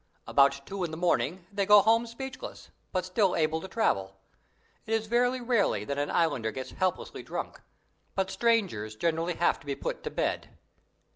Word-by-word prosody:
About 140 Hz, 0 st, +4 dB
two 195 Hz, -1 st, -4 dB
in 170 Hz, -, -1 dB
the 160 Hz, -, -6 dB
morning 175 Hz, 0 st, 0 dB
they 200 Hz, 0 st, +1 dB
go 205 Hz, 0 st, +7 dB
home 230 Hz, +2 st, +3 dB
speechless, 265 Hz, -, -8 dB, 0.2 s
but 185 Hz, -1 st, -1 dB
still 185 Hz, 0 st, +2 dB
able 160 Hz, 0 st, +1 dB
to 190 Hz, -, -7 dB
travel. 95 Hz, -, 0 dB, 0.7 s
It 225 Hz, -, +1 dB
is 220 Hz, 0 st, -1 dB
very 245 Hz, +3 st, +2 dB
rarely 235 Hz, -4 st, +1 dB
that 140 Hz, 0 st, -2 dB
an 145 Hz, -, -1 dB
Islander 145 Hz, -10 st, +1 dB
gets 130 Hz, +2 st, -6 dB
helplessly 185 Hz, -1 st, -2 dB
drunk, -, -, -6 dB, 0.5 s
but 190 Hz, -1 st, 0 dB
strangers 190 Hz, -, +1 dB
generally 165 Hz, +5 st, 0 dB
have 175 Hz, -, +2 dB
to -, -, -18 dB
be 140 Hz, -, -1 dB
put -, -, -4 dB
to -, -, -4 dB
bed. -, -, -2 dB
185 Hz, 175 wpm, -29 LUFS, 155-225 Hz, 0.7 s, go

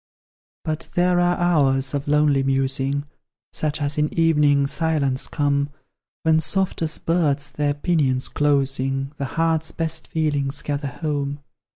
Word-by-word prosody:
But 155 Hz, -2 st, -3 dB
there 180 Hz, 0 st, +3 dB
are 175 Hz, 0 st, +2 dB
hours 140 Hz, -6 st, +2 dB
of 140 Hz, 0 st, -3 dB
lonely 150 Hz, -2 st, +3 dB
musing, 135 Hz, +1 st, 0 dB, 0.5 s
Such 155 Hz, 0 st, -2 dB
as 145 Hz, 0 st, -2 dB
in 150 Hz, 0 st, +1 dB
evening 150 Hz, -4 st, +4 dB
silence 140 Hz, -2 st, 0 dB
come, 145 Hz, -1 st, 0 dB, 0.5 s
When, 160 Hz, 0 st, +4 dB
soft 190 Hz, +4 st, 0 dB
as 160 Hz, -1 st, 0 dB
birds 145 Hz, -4 st, +1 dB
their 145 Hz, 0 st, -1 dB
pinions 145 Hz, -5 st, 0 dB
closing, 135 Hz, -1 st, 0 dB
The 140 Hz, -, -2 dB
heart's 160 Hz, +2 st, 0 dB
best 160 Hz, 0 st, -3 dB
feelings 145 Hz, -3 st, -1 dB
gather 145 Hz, 0 st, -2 dB
home. 145 Hz, 0 st, -3 dB
145 Hz, 135 wpm, -22 LUFS, 140-160 Hz, 0.5 s, evening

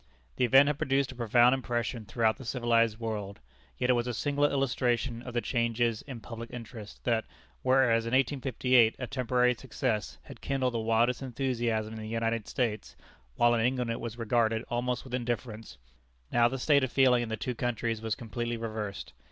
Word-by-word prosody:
The -, -, +3 dB
event 135 Hz, +3 st, +7 dB
had 145 Hz, 0 st, -1 dB
produced 135 Hz, 0 st, +1 dB
a -, -, -11 dB
profound 120 Hz, +1 st, +4 dB
impression 120 Hz, -3 st, -2 dB
throughout 110 Hz, -2 st, +1 dB
the -, -, -10 dB
civilized 115 Hz, -2 st, +1 dB
world. 105 Hz, -3 st, -4 dB, 0.4 s
Yet 125 Hz, 0 st, +2 dB
it -, -, +5 dB
was 120 Hz, 0 st, 0 dB
a 120 Hz, -, -2 dB
singular 145 Hz, +2 st, +1 dB
illustration 120 Hz, -3 st, 0 dB
of 125 Hz, -1 st, -8 dB
the 120 Hz, -, +1 dB
changes 115 Hz, -2 st, 0 dB
in 125 Hz, -5 st, -7 dB
public 115 Hz, 0 st, -8 dB
interest, 115 Hz, -3 st, -9 dB
that, 115 Hz, -2 st, +1 dB, 0.4 s
whereas 130 Hz, -3 st, +3 dB
in 115 Hz, -, -3 dB
1858 130 Hz, -3 st, +3 dB
a 125 Hz, -, -4 dB
temporary 125 Hz, 0 st, +1 dB
success 115 Hz, -4 st, -3 dB
had -, -, -12 dB
kindled 130 Hz, -2 st, -1 dB
the 115 Hz, -, -1 dB
wildest 115 Hz, +3 st, +1 dB
enthusiasm 120 Hz, -4 st, -2 dB
in 110 Hz, -, -7 dB
the 110 Hz, -, -6 dB
United 115 Hz, -1 st, -1 dB
States, 110 Hz, -4 st, -2 dB, 0.4 s
while 120 Hz, -, +4 dB
in 115 Hz, -1 st, +1 dB
England 125 Hz, -1 st, 0 dB
it 115 Hz, -, -3 dB
was 115 Hz, 0 st, -6 dB
regarded 115 Hz, -1 st, +1 dB
almost 125 Hz, +1 st, -1 dB
with 130 Hz, -, -11 dB
indifference, 115 Hz, -, -4 dB, 0.5 s
now 120 Hz, 0 st, +4 dB
the 135 Hz, +3 st, -3 dB
state 140 Hz, +1 st, +3 dB
of 130 Hz, -, -1 dB
feeling 130 Hz, -3 st, +4 dB
in 120 Hz, -, -4 dB
the 110 Hz, -, -3 dB
two 125 Hz, +4 st, -3 dB
countries 115 Hz, -2 st, -2 dB
was 110 Hz, -1 st, -2 dB
completely 120 Hz, +1 st, -4 dB
reversed. 110 Hz, -3 st, -5 dB
120 Hz, 185 wpm, -29 LUFS, 115-125 Hz, 0.5 s, event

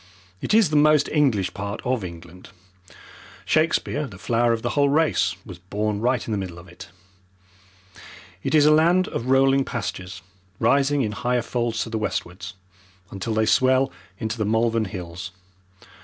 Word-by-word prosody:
It -, -, +1 dB
is 215 Hz, -8 st, +4 dB
the -, -, 0 dB
most 150 Hz, -1 st, +4 dB
English 120 Hz, -, +1 dB
part 100 Hz, +2 st, -5 dB
of 125 Hz, -4 st, 0 dB
England. 85 Hz, 0 st, -10 dB, 1.0 s
Shakespeare, 155 Hz, -2 st, +1 dB
the 95 Hz, -, -12 dB
flower 120 Hz, +4 st, +1 dB
of 115 Hz, -1 st, -1 dB
the 120 Hz, -, -1 dB
whole 140 Hz, +1 st, +2 dB
race, 150 Hz, -, +2 dB
was 90 Hz, -2 st, -10 dB
born 100 Hz, +3 st, -3 dB
right 125 Hz, +1 st, 0 dB
in -, -, -3 dB
the 105 Hz, -, -1 dB
middle 90 Hz, -3 st, -6 dB
of 85 Hz, +1 st, -13 dB
it. -, -, -12 dB, 1.5 s
It -, -, -1 dB
is 150 Hz, -1 st, +6 dB
a 150 Hz, -, +6 dB
land 175 Hz, +4 st, +3 dB
of 115 Hz, -, -4 dB
rolling 135 Hz, +1 st, +4 dB
pastures, 95 Hz, -8 st, -5 dB, 0.4 s
rising 140 Hz, 0 st, +2 dB
in 105 Hz, -, -2 dB
higher 120 Hz, +3 st, -1 dB
folds 120 Hz, -1 st, -2 dB
to 115 Hz, -, -9 dB
the 110 Hz, -, -2 dB
westwards, 90 Hz, -3 st, -4 dB, 0.6 s
until 105 Hz, +3 st, -4 dB
they 110 Hz, 0 st, +2 dB
swell 130 Hz, +3 st, +3 dB, 0.3 s
into 110 Hz, -2 st, -4 dB
the -, -, +1 dB
Malvern 115 Hz, +1 st, +1 dB
Hills. 90 Hz, -1 st, -7 dB
115 Hz, 165 wpm, -23 LUFS, 100-135 Hz, 1.5 s, is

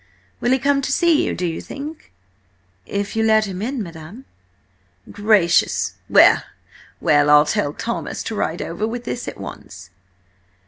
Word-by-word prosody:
Will 240 Hz, -, 0 dB
he 260 Hz, -, +4 dB
come 275 Hz, +1 st, +1 dB
to 275 Hz, -, -3 dB
see 335 Hz, +1 st, +3 dB
you, -, -, -2 dB
do 180 Hz, -, -3 dB
you 165 Hz, -1 st, -3 dB
think?" 295 Hz, +3 st, -9 dB, 0.8 s
"If 200 Hz, +1 st, -3 dB
you 225 Hz, -, +1 dB
let 220 Hz, -1 st, +4 dB
him 190 Hz, -2 st, -6 dB
in, 245 Hz, +1 st, -3 dB
madam!" 170 Hz, +8 st, -11 dB, 0.9 s
"Gracious! 205 Hz, -5 st, +2 dB, 0.2 s
Well, -, -, +6 dB, 0.6 s
well! 145 Hz, 0 st, +3 dB
I'll 150 Hz, 0 st, +7 dB
tell 145 Hz, -1 st, -1 dB
Thomas 235 Hz, +9 st, -4 dB
to 225 Hz, -, -5 dB
ride 175 Hz, -5 st, -2 dB
over 190 Hz, +6 st, -3 dB
with 240 Hz, +1 st, -5 dB
this 125 Hz, -, -5 dB
at -, -, -7 dB
once." 90 Hz, 0 st, -10 dB
210 Hz, 155 wpm, -20 LUFS, 165-245 Hz, 0.9 s, I'll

